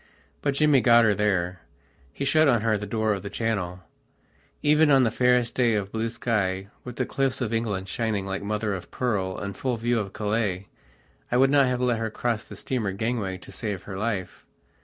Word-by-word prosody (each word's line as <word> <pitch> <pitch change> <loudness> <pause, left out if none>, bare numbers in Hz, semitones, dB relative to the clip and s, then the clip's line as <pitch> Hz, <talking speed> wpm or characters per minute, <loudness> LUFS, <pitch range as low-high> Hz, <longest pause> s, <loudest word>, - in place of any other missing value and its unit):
But 140 -1 0
Jimmy 150 -2 +4
got 120 -1 +6
her, 105 - +4
there: 90 -4 0 0.5
he 140 - -4
shut 155 +3 +4
on 120 -5 +3
her 110 -1 +2
the 105 0 -4
door 110 0 0
of 100 - -4
the 100 - -6
Channel; 90 -6 -2 0.8
even 150 +1 +4
on 135 -2 +6
the 115 - +2
fairest 125 0 +2
day 120 -3 +2
of 100 -1 -2
blue 115 +1 -1
sky, 100 -5 -1
with 125 -1 -8
the - - -1
cliffs 135 -1 -1
of 120 -3 -2
England 105 -4 -1
shining 110 -2 -1
like 95 0 -3
mother 105 0 -2
of 95 - -6
pearl 100 -7 -1
in 100 0 -4
full 125 +4 -2
view 120 +1 +1
of 100 -2 -4
Calais, 105 -3 -2 0.6
I 125 - +3
would 135 +1 +4
not 140 -2 +5
have 125 0 -1
let 120 -3 +1
her 115 0 -2
cross 115 0 -2
the - - -11
steamer 110 -7 -2
gangway 105 -3 -2
to - - -13
save 105 -5 -4
her 95 - -7
life. 100 -2 -3
110 Hz, 205 wpm, -25 LUFS, 100-125 Hz, 0.8 s, got